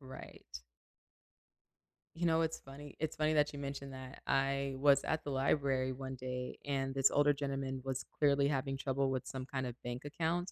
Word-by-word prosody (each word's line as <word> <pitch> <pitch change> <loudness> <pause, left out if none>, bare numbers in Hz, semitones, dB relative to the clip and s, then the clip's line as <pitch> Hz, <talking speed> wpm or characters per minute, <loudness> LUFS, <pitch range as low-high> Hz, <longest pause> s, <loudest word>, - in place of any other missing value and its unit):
Right. 130 -1 -10 1.7
You 175 - -1
know, 165 -1 +4
it's 160 0 0
funny 140 +1 -10
it's 160 0 -1
funny 155 0 +2
that 150 -1 +3
you 145 - -6
mentioned 140 -1 -5
that. 130 0 -9
I 135 0 +1
was 140 0 +5
at 160 - 0
the 145 - -4
library 135 -1 +2
one 130 0 -5
day 125 0 -4
and 135 -1 0
this 135 -1 +4
older 145 0 +5
gentleman 135 -2 -2
was 135 -1 -2
clearly 140 -1 +4
having 135 -1 0
trouble 135 0 0
with 130 -2 -2
some 130 -1 -4
kinda 130 -3 -3
bank 120 +3 -4
account 170 +4 -1
135 Hz, 175 wpm, -35 LUFS, 130-145 Hz, 1.7 s, was